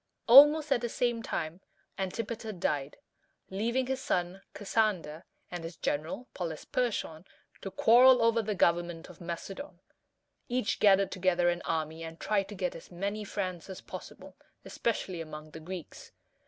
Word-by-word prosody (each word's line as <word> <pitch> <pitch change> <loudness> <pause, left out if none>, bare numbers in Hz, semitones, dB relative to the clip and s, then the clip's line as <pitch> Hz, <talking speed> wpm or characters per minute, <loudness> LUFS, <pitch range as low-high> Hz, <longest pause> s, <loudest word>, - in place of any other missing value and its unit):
Almost 295 +4 +8
at 240 - +3
the 240 - -2
same 240 0 0
time, 170 -4 -4 0.3
Antipater 220 +3 -4
died, 150 -7 -2 0.5
leaving 235 +7 0
his 265 +1 -2
son, 180 -1 -1
Cas 205 - -7
san´der, 185 -8 +1 0.3
and 175 -2 -5
his 165 +1 -7
general, 160 - -3
Pol 175 -3 -3
ys 155 - -11
per´chon, 215 -10 -2 0.4
to 195 - -5
quarrel 250 +6 +6
over 230 0 +3
the 210 -1 -2
government 170 -1 +1
of 180 - -17
Macedon. 190 - -7 0.7
Each 245 -3 0
gathered 195 -1 +5
together 180 -2 +2
an 175 0 -1
army, 160 0 -2
and 165 0 -8
tried 200 -2 0
to 205 - -7
get 180 -1 -2
as 165 - -11
many 200 +4 -3
friends 185 -4 -4
as 190 - -7
possible, - - -10 0.3
especially 190 -6 -2
among 155 -1 -9
the 160 - -9
Greeks. 175 +1 -8
190 Hz, 155 wpm, -30 LUFS, 170-230 Hz, 0.7 s, Almost